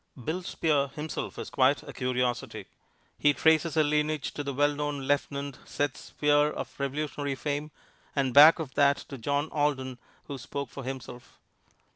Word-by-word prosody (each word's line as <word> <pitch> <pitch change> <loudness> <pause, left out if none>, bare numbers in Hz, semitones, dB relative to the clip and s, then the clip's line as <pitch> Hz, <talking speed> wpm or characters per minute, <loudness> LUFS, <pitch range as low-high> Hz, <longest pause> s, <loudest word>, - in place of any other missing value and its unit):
"Bill 170 +4 -2
Spear" 150 -5 +1
himself 150 +3 -5
is - - -6
quite 135 +1 +3
a - - -9
curiosity. 125 -1 -2 0.5
He 145 -1 +4
traces 160 0 +3
a 155 - +6
lineage 150 0 0
to 145 - -4
the 140 - -3
well 145 +2 +2
known 145 -1 -3
Lieutenant 140 0 -2
Seth 145 -2 -2
Spear, 145 0 +2
of - - -6
Revolutionary 145 0 -2
fame, 145 +2 -3 0.5
and 135 -3 +1
back 150 +4 +9
of 150 -6 -6
that 140 0 +4 0.2
to 135 - -6
John 145 +5 0
Alden, 130 -4 -1 0.2
who 140 -2 -7
spoke 140 +1 -5
for 140 - -7
himself. 125 -1 -8
145 Hz, 160 wpm, -28 LUFS, 135-150 Hz, 0.5 s, back